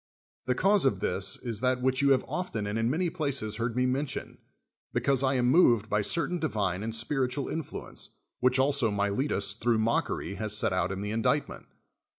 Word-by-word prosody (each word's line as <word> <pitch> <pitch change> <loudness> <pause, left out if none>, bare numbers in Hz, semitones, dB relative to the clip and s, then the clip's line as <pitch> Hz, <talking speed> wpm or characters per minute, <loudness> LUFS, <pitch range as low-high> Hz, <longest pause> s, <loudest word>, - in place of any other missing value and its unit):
The 125 - +2
cause 195 +5 +4
of 105 -8 +2
this 95 +1 0
is 115 -4 -2
that 125 +1 +1
which 130 +1 +2
you 140 - +4
have 135 -2 +3
often 180 - -3
and 105 +2 -2
in 115 +1 +1
many 170 +7 0
places 140 - -2
heard 115 0 -2
me 125 0 +2
mention: 135 +3 -3 0.5
because 135 -2 +1
I 135 0 +2
am 125 -1 +2
moved 125 - +4
by 105 - +2
certain 170 - -1
di\ 160 - 0
iiK' 100 - -1
and 115 0 -1
spiritual 130 +3 -1
influence, 160 -3 -5 0.3
which 125 +1 +3
also 135 -3 +2
I\Iile 100 +7 0
tus, 100 0 0
thrmiuii 115 +1 +1
mockery, 110 -3 -1
has 105 -1 -1
set 100 - +1
out 90 0 0
in 95 0 -4
the 105 +1 -3
indict 110 0 +1
ment. - - -11
125 Hz, 200 wpm, -28 LUFS, 105-140 Hz, 0.5 s, cause